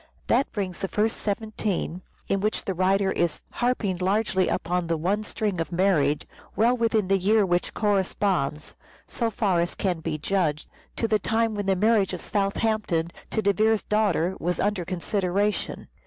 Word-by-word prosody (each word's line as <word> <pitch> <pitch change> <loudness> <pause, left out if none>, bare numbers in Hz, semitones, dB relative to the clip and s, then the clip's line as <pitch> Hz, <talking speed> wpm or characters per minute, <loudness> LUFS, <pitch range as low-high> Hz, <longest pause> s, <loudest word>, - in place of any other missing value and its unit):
That 275 - +2
brings 190 -4 -3
the 195 - -2
first 215 +3 0
17, 205 -4 -2 0.3
in 195 - +1
which 215 +2 -1
the 190 - -1
writer 190 +2 +2
is 170 -4 -1
harping 240 -7 0
largely 190 0 +1
upon 175 0 -1
the 165 -1 0
one 190 +7 0
string 210 -4 -2
of 165 - -4
marriage, 170 -6 +2 0.3
well 235 +3 +3
within 225 -4 +1
the 195 0 +3
year 210 +3 +3
which 175 -1 0
corresponds, 190 -7 0 0.3
so 230 -2 -1
far 195 -4 +1
as 170 +1 -1
can 180 -4 -1
be 160 -1 -3
judged, 155 -2 0 0.3
to 230 - 0
the 215 -1 +2
time 225 0 +1
when 205 -1 -3
the 195 - +3
marriage 205 -1 +2
of 180 - -4
Southampton 200 -4 0 0.2
to 220 - -1
De 200 0 +3
Vere's 220 +2 +2
daughter 195 -4 +1
was 175 +2 -1
under 200 -3 0
consideration. 195 +3 -1
195 Hz, 170 wpm, -25 LUFS, 180-215 Hz, 0.3 s, well